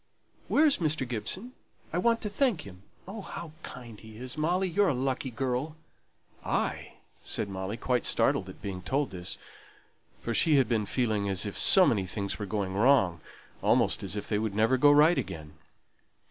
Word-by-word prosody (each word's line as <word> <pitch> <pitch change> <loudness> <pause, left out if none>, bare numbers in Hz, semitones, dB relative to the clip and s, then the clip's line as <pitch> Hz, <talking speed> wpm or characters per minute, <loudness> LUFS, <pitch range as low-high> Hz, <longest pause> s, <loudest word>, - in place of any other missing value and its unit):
Where 310 - +4
is 290 - +4
Mr. 155 -5 0
Gibson? 185 - -2 0.4
I 175 - +1
want 230 +4 +2
to - - -3
thank 225 - +1
him. 90 -5 -12 0.3
Oh, 205 +3 -7
how 170 -4 -8
kind 120 -4 -9
he 110 -1 -13
is! 125 +1 -5
Molly, 175 +5 0
you're 195 +3 +2
a 145 - +1
lucky 130 +1 -2
girl!" 130 +5 -3 0.7
"I?" - - -2 0.3
said - - -1
Molly, 95 +2 -5
quite 125 0 0
startled - - +1
at - - -13
being 95 -3 -5
told 135 +10 -1
this; 90 -1 -5 0.8
for 115 - -3
she 155 +5 +3
had 135 -4 +4
been 110 -3 0
feeling 110 -5 0
as 95 +1 0
if 100 - -5
so 190 -2 +6
many 100 - +1
things 100 +4 -4
were 105 - -4
going 95 -1 -2
wrong, 100 - +3 0.4
almost - - +2
as 100 0 -5
if 105 - -5
they 105 - 0
would 110 -2 -3
never 110 +5 +3
go 145 +3 +5
right 150 +4 +5
again. 75 -2 -7
125 Hz, 185 wpm, -28 LUFS, 100-155 Hz, 0.8 s, so